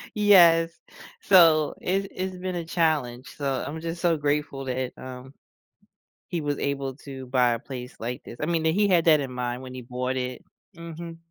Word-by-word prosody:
Yes, 170 -6 +6 0.5
so, 165 -5 +5
it's 195 +2 0
it's 185 0 -4
been 185 0 -4
a 170 -1 -4
challenge, 150 -7 0
so, 135 -2 -1
I'm 160 +2 -5
just 165 +1 -5
so, 170 -2 +2
grateful 145 -2 -1
that, 130 0 -3
um, 130 +1 -9 0.9
he 175 - -2
was 145 -1 -2
able 140 -2 -2
to 135 -2 -9
buy 125 -1 +3
a 115 - -3
place 125 0 -8
like 120 +2 -5
this, 120 - -10
I - - 0
mean, 165 0 0
that 160 0 +2
he 205 +3 +3
had 175 -4 +3
that 155 -3 +6
in 135 -2 -5
mind 125 0 -3
when 130 -1 -9
he 130 - -7
bought 125 +1 -3
it 125 -1 -4 0.3
Mhm. 170 0 -8
145 Hz, 190 wpm, -25 LUFS, 130-170 Hz, 0.9 s, Yes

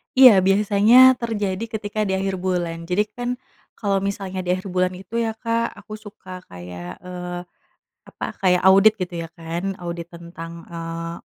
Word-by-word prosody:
Iya, 255 -2 +10 0.2
biasanya 205 +3 +4 0.2
terjadi 205 -5 -2
ketika 215 -1 -5
di 190 - 0
akhir 195 0 -1
bulan. 170 -2 -2
Jadi 190 +4 +2
kan 245 0 -3 0.5
kalau 200 -3 0
misalnya 195 -1 -3
di 180 -1 -4
akhir 185 0 -7
bulan 185 0 +1
itu 200 +5 -5
ya, 225 -1 -1
Kak, 230 0 -1
aku - - -15
suka 200 -3 -10
kayak, 90 - -9
eee, 180 -1 -6 0.7
apa, - - -6 0.2
kayak 180 -2 +3
audit 195 +3 +7
gitu 180 0 -3
ya - - -9
kan. 170 +4 -4
Audit 170 0 -6
tentang, 170 -1 -9 0.2
eee, 165 0 -5
185 Hz, 160 wpm, -22 LUFS, 170-205 Hz, 0.7 s, Iya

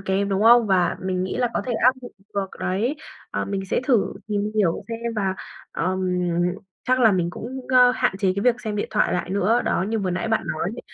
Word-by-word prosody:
kém, 195 +1 0
đúng 195 +1 0
không? 235 0 +7
Và 185 -3 +2
mình 185 -1 -1
nghĩ 185 - -4
là 245 -1 +1
có - - 0
thể 250 - -1
áp 245 +3 +4
dụng 245 - -9 0.2
được 195 -1 -2
đấy, 220 +11 -1 0.3
à, - - -2
mình 195 -1 -3
sẽ - - 0
thử 240 -7 +2 0.2
tìm 210 0 -1
hiểu 195 -2 +1
xem 230 0 -4
và, 195 -2 0 0.4
ờm, 185 +2 -1 0.9
chắc 255 0 +3
là 225 -4 +6
mình 175 -2 0
cũng, 250 +8 -7
ơ, 250 -1 +6
hạn 245 -6 0
chế 195 -2 +2
cái 200 - -1
việc 245 -1 +2
xem 215 -2 -4
điện 205 - -2
thoại - - +1
lại 180 - -2
nữa. 200 +5 +2
Đó, - - +1
như 225 0 -1
vừa 190 -2 -1
nãy 185 +6 -2
bạn 220 - +1
nói 155 - -3
ấy, - - -6
205 Hz, 235 wpm, -23 LUFS, 190-235 Hz, 0.9 s, không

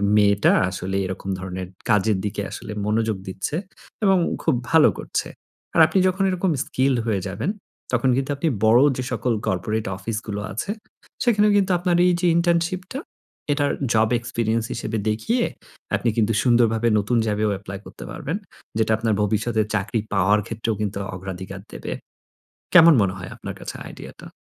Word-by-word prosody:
মেয়েটা 100 -1 +4 0.2
আসলে 95 +1 -3
এরকম 95 +1 -5
ধরনের 95 0 -5 0.2
কাজের 105 -1 +3
দিকে 105 0 -2
আসলে - - -7
মনোযোগ 110 0 0
দিচ্ছে। 95 +9 -3 0.5
এবং 195 -1 +5 0.3
খুব - - +3 0.2
ভালো 160 -2 +7
করছে। - - -2 0.5
আর - - +6
আপনি 175 +4 +1
যখন 185 +1 +1
এরকম 185 0 0
স্কিলড 130 0 +1
হয়ে 100 -4 +1
যাবেন। 110 - -2 0.4
তখন 125 +1 +2
কিন্তু 135 +1 -1
আপনি 140 +4 -1 0.2
বড় 115 +3 +6 0.2
যে 130 - -2
সকল 125 0 0
কর্পোরেট 105 +5 -1
অফিসগুলো 105 +1 -4
আছে, 115 - -3 0.5
সেখানেও 210 -3 +4
কিন্তু 195 -1 +2
আপনার 175 -1 +1
এইযে 175 0 +2
ইন্টার্নশিপটা 175 +7 0 0.5
এটার 145 0 +1 0.2
জব 110 0 +3
এক্সপেরিয়েন্স 115 -1 -1
হিসেবে 115 -1 -3
দেখিয়ে 225 - 0 0.5
আপনি 120 - +1
কিন্তু 115 0 +2
সুন্দরভাবে 120 -2 +3
নতুন 115 +4 0
জবে 105 0 +1
এপ্লাই 100 -1 -7
করতে - - -10
পারবেন। 160 +5 -3 0.4
যেটা 110 0 +1
আপনার 110 0 0
ভবিষ্যতে 110 +2 +1
চাকরি 105 +4 0
পাওয়ার 100 +2 +4
ক্ষেত্রেও 115 0 -2
কিন্তু 100 -2 -2 0.2
অগ্রাধিকার 95 +1 -7
দেবে। - - -6 0.8
কেমন 170 -2 +9
মনে 95 -2 +1
হয় 90 -1 -7
আপনার - - -7
কাছে - - -6
আইডিয়াটা? - - -11
110 Hz, 150 wpm, -23 LUFS, 100-150 Hz, 0.8 s, কেমন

